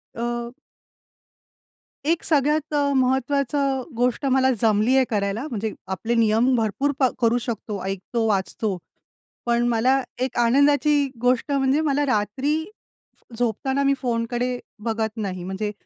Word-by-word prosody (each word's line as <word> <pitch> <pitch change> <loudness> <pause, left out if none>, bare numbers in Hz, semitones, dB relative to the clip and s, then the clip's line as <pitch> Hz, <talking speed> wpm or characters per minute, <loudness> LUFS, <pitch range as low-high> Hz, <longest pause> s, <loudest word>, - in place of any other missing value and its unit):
अ 240 +1 -3 1.5
एक 325 +2 +1
सगळ्यात 300 0 +1
अ, - - +2 0.2
महत्वाचं 265 +1 +1 0.2
गोष्ट 245 +3 0
मला 265 -1 +3
जमलीय 225 +4 +3
करायला, 205 +4 -1
म्हणजे 220 -2 -3 0.2
आपले 230 +5 -2
नियम 230 +3 +3
भरपूर 235 +5 0
प 270 - +2 0.2
करू 235 0 +3
शकतो, 220 -4 -4
ऐकतो, 195 +4 -2
वाचतो. 200 0 -1 0.7
पण 240 0 +2
मला 250 +4 +2 0.2
एक 255 -1 -2
आनंदाची 285 +4 +3
गोष्ट 250 +3 +1
म्हणजे 275 +2 +2
मला 290 -1 +1
रात्री 260 +5 0 0.8
झोपताना, 255 +4 0
मी 275 0 +3
फोनकडे 245 +1 -1 0.2
बघत 220 -1 -1
नाही. 185 -4 -4
म्हणजे 195 +3 -3
245 Hz, 120 wpm, -23 LUFS, 220-270 Hz, 1.5 s, मला